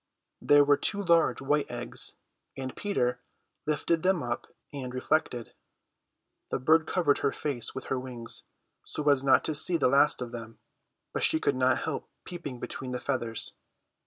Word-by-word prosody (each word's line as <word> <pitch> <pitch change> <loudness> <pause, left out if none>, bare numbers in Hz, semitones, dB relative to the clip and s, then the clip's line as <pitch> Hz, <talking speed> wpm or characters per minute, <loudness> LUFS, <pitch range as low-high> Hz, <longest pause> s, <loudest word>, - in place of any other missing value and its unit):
There 145 0 +6
were 145 0 +4
two 205 - 0
large 170 -7 +3
white 145 +2 +1
eggs, - - -4 0.4
and 130 -1 -5
Peter 125 -12 -1 0.5
lifted 155 +2 +1
them 185 -3 +2
up 120 0 -3 0.3
and 130 -3 -5
reflected. 130 -3 -1 1.0
The - - 0
bird 155 +5 +3
covered 155 -6 +2
her 140 - +1
face 135 -6 -1
with 130 - -5
her 130 - -1
wings, 125 -2 -3 0.4
so 150 - -5
as 135 -2 +3
not 135 -1 +5
to 155 - -1
see 170 +4 +3
the 130 -5 +3
last 145 +3 +4
of 125 -2 -4
them; 115 -1 -8 0.6
but - - -1
she 160 - +4
could 140 - +1
not 130 0 +2
help - - -4 0.2
peeping 150 -8 -6
between 130 - -5
the 125 - -2
feathers. 120 -4 -1
140 Hz, 165 wpm, -29 LUFS, 125-155 Hz, 1.0 s, There